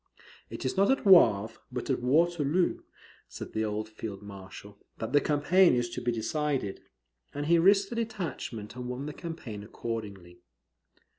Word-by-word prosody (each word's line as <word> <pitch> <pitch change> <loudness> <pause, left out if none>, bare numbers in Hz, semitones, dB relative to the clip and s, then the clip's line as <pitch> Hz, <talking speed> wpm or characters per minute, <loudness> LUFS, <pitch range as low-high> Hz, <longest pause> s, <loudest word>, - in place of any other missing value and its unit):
"It - - -7
is 130 - -1
not 195 +1 +4
at 270 - +1
Wavre, 115 - +5
but 125 +2 -3
at 130 - -1
Waterloo," 165 +4 +2 0.5
said - - -9
the 110 - 0
old 110 0 -2
Field 110 -2 -7
Marshal, 100 0 -11 0.2
"that 110 +3 -5
the 145 - +5
campaign 155 +3 +4
is 120 -1 -1
to 125 - -5
be 120 0 0
decided;" 130 -2 -2 0.5
and 145 0 -2
he 170 +2 +4
risked 195 +4 +4
a - - -3
detachment, 180 - -4
and 125 0 -6
won 125 +3 -4
the 150 - -5
campaign 145 - -7
accordingly. 105 -5 -6
125 Hz, 160 wpm, -29 LUFS, 110-165 Hz, 0.5 s, Wavre